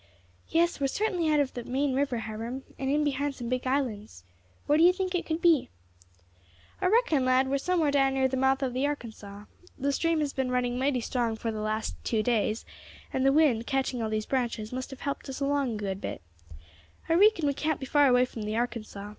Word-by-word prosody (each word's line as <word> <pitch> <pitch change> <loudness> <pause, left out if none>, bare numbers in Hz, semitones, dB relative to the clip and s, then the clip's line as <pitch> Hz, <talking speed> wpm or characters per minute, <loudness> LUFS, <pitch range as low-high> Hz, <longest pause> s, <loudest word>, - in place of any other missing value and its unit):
"Yes, 340 0 +2
we 280 - +1
are - - +3
certainly 355 0 0
out 300 - +3
of 280 -2 0
the 245 - -5
main 270 +3 -1
river, 270 -2 0
Hiram, 230 +5 -5 0.2
and 265 0 -1
in 295 +2 +2
behind 285 -1 -1
some 240 -2 -6
big 255 0 -1
islands. 220 - -2 0.4
Where 295 - +3
do - - +6
you 355 - +8
think 370 0 -3
it 360 - -2
could 320 +1 -2
be?" 330 -6 +4 1.1
"I - - +2
reckon, 390 - +3
lad, 255 +1 +3
we 265 - -2
are - - +3
somewhere 330 -1 +1
down 270 -1 +2
near 265 -1 +3
the 260 - -3
mouth 265 +1 +2
of 255 -2 -1
the 260 +3 +1
Arkansas. 215 -7 -7 0.3
The 280 +1 0
stream 330 +3 +1
has 290 -2 -2
been 265 -1 -1
running 250 0 0
mighty 265 -2 +1
strong 235 -1 -1
for 225 +1 -3
the 215 -1 -4
last 215 +1 -2
two 220 -2 0
days, 220 -1 0 0.5
and 260 - 0
the 270 - +5
wind, 275 -6 +3
catching 270 -3 -1
all 220 - -1
these 215 0 -2
branches, 235 -4 -2
must 255 0 -4
have 270 - -10
helped 280 -1 -4
us 265 - -5
along 280 -3 0
a - - -3
good 195 -2 -4
bit. - - -5 0.8
I - - +2
reekon 390 -2 +5
we 285 - +2
can't 310 +1 -1
be 265 - -5
far 290 +1 +4
away 250 -1 +4
from 235 -3 -8
the 210 +1 -3
Arkansas. 220 -4 -4
265 Hz, 230 wpm, -28 LUFS, 235-290 Hz, 1.1 s, you